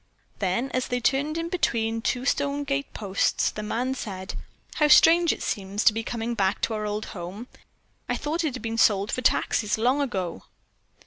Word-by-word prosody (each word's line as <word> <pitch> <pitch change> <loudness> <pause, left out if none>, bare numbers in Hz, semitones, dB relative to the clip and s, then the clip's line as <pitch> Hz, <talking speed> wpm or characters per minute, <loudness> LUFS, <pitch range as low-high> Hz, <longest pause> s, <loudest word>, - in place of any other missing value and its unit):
Then, 205 +7 -1
as 255 0 -1
they 245 - -1
turned 280 +6 0
in 330 0 -2
between 225 -10 0
two 250 +2 -1
stone 285 0 0
gate 280 0 -2
posts, 200 -2 0
the 215 - -6
man 240 +5 -1
said: 190 -7 -6 0.4
"How 300 - +4
strange 335 +2 +6
it - - -4
seems 200 +1 -2
to - - +6
be, 225 - -2
coming 235 0 -3
back 195 -3 0
to 230 - 0
our 215 -1 -2
old 210 +1 -3
home. 185 +5 -7 0.6
I - - +1
thought 320 +3 -2
it 295 -5 -1
had 250 - -8
been 225 0 -2
sold 205 -2 +3
for 255 - -1
taxes 220 -4 +1
long 250 +6 +2
ago." 190 - -3
230 Hz, 190 wpm, -25 LUFS, 210-275 Hz, 0.6 s, strange